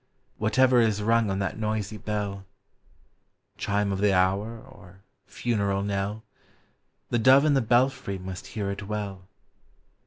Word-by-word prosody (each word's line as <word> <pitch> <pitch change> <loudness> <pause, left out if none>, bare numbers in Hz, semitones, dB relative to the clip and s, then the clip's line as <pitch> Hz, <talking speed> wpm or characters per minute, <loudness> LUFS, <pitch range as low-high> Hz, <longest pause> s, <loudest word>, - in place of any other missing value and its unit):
Whatever 125 +3 +4
is 105 -2 +1
rung 115 0 +2
on 95 - -1
that 100 +2 -3
noisy 110 -1 -2
bell, 100 -2 -4 0.6
— - - -43
Chime 100 0 0
of 95 - -2
the 105 0 +3
hour, 100 +5 +1
or 95 -2 -16 0.2
funeral 100 -4 -1
knell, 100 +2 -3 0.4
— - - -45
The 120 - +2
dove 135 +5 +6
in 150 - +4
the 135 - +3
belfry 120 -4 +1
must 95 0 -8
hear 100 -3 -3
it 100 0 -6
well. 100 -3 -5
105 Hz, 150 wpm, -26 LUFS, 100-115 Hz, 0.6 s, dove